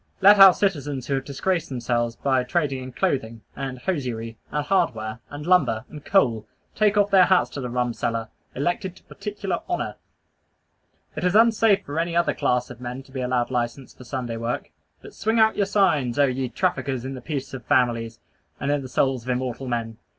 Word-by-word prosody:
Let 205 +1 +7
our 195 -2 +10
citizens 145 -9 -1
who 140 - -2
have 135 0 -1
disgraced 165 +5 -1
themselves 120 -2 -1
by 130 -2 +1
trading 140 -1 -1
in 130 0 -7
clothing, 115 -3 -1
and 135 -2 -5
hosiery, 125 -7 -3 0.2
and 150 0 -1
hardware, 120 - 0
and 145 +1 -7
lumber, 145 -11 +3
and 150 -2 -10
coal, 115 - +2 0.3
take 210 -1 +2
off 205 0 +3
their 190 -2 +7
hats 185 0 +3
to 140 - -5
the 125 - -4
rum 125 0 -1
seller, 115 -1 -2 0.3
elected 175 +6 -2
to - - -19
particular 205 -3 -4
honor. 350 - -2 1.2
It - - -4
is 180 +2 +2
unsafe 225 -2 +4
for 145 +3 -3
any 170 0 -1
other 170 0 +2
class 125 0 0
of 125 0 -11
men 125 +2 -6
to 135 - -20
be 130 -1 -4
allowed 125 0 0
license 120 +1 -3
for - - -13
Sunday 120 -2 -4
work. 115 +1 -3 0.3
But - - -11
swing 220 +3 0
out 220 0 +5
your 200 - +1
signs, 160 - +2
oh 145 - +5
ye 130 -1 -2
traffickers 130 +2 -1
in 135 - -4
the 130 - -8
peace 135 0 -5
of 130 -2 -6
families, 120 -4 +1 0.4
and 140 - -1
in 145 -1 +1
the 130 - -8
souls 130 -1 +1
of 125 - -9
immortal 125 +1 -2
men! 115 -2 -3
135 Hz, 200 wpm, -24 LUFS, 120-175 Hz, 1.2 s, our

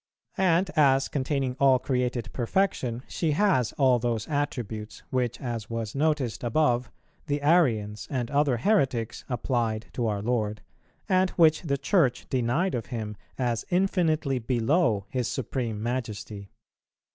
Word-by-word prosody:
And 185 0 +3
as 135 -3 +4
containing 135 -2 -1
all 135 -2 +5
created 125 -2 -2
perfection, 125 -3 0
she 160 -3 -1
has 145 - +2
all 130 -3 +3
those 115 -2 -2
attributes, 120 -8 -3
which, 125 -2 -1
as 115 -5 -4
was 115 -2 -4
noticed 145 -6 0
above, 125 -1 +1 0.4
the 145 -1 0
Arians 115 -11 +2
and 125 -4 -2
other 140 -3 +2
heretics 125 - +1
applied 115 -3 -1
to 120 -2 -1
our 100 -2 -2
Lord, 110 -3 -1 0.4
and 185 -1 +3
which 160 -2 +5
the 140 -5 -1
Church 145 - +1
denied 130 +9 +1
of 115 -5 -3
Him 110 -1 -5 0.2
as 120 -3 -1
infinitely 165 -7 +1
below 120 - +1
His 125 +1 -2
Supreme 115 -4 -3
Majesty. 110 -5 -4
125 Hz, 135 wpm, -27 LUFS, 115-150 Hz, 0.4 s, all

